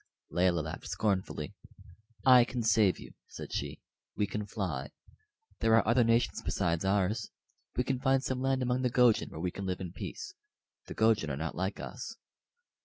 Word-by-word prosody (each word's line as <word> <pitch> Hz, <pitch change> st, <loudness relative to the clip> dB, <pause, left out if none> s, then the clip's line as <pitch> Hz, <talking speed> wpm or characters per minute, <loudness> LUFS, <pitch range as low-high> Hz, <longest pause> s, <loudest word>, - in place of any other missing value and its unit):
Layelah 90 Hz, -2 st, +2 dB
laughed 80 Hz, +1 st, -6 dB
scornfully. 95 Hz, +2 st, -1 dB, 0.7 s
"I 125 Hz, -2 st, +8 dB
can 120 Hz, 0 st, -3 dB
save 110 Hz, -4 st, +4 dB
you," -, -, -11 dB, 0.2 s
said -, -, -8 dB
she. -, -, -3 dB, 0.3 s
"We 105 Hz, -, +1 dB
can 105 Hz, +1 st, -4 dB
fly. 80 Hz, -, -3 dB, 0.7 s
There 115 Hz, 0 st, +4 dB
are 115 Hz, -, +3 dB
other 120 Hz, +2 st, +5 dB
nations 115 Hz, +1 st, +2 dB
beside 85 Hz, 0 st, 0 dB
ours. 95 Hz, +2 st, +1 dB, 0.5 s
We 125 Hz, -, +2 dB
can 130 Hz, 0 st, -1 dB
find 135 Hz, 0 st, +2 dB
some 130 Hz, -1 st, -2 dB
land 135 Hz, -1 st, +1 dB
among 125 Hz, +1 st, 0 dB
the 125 Hz, -, +2 dB
Gojin 120 Hz, -3 st, +4 dB
where -, -, -8 dB
we 90 Hz, +2 st, -1 dB
can 100 Hz, +1 st, -5 dB
live 90 Hz, -1 st, -2 dB
in 90 Hz, -3 st, -6 dB
peace. 405 Hz, -, -6 dB, 0.5 s
The -, -, -7 dB
Gojin 110 Hz, -7 st, +3 dB
are 65 Hz, -, -3 dB
not 80 Hz, +2 st, -3 dB
like 95 Hz, +3 st, -3 dB
us." 130 Hz, -, -6 dB
105 Hz, 180 wpm, -31 LUFS, 90-125 Hz, 0.7 s, I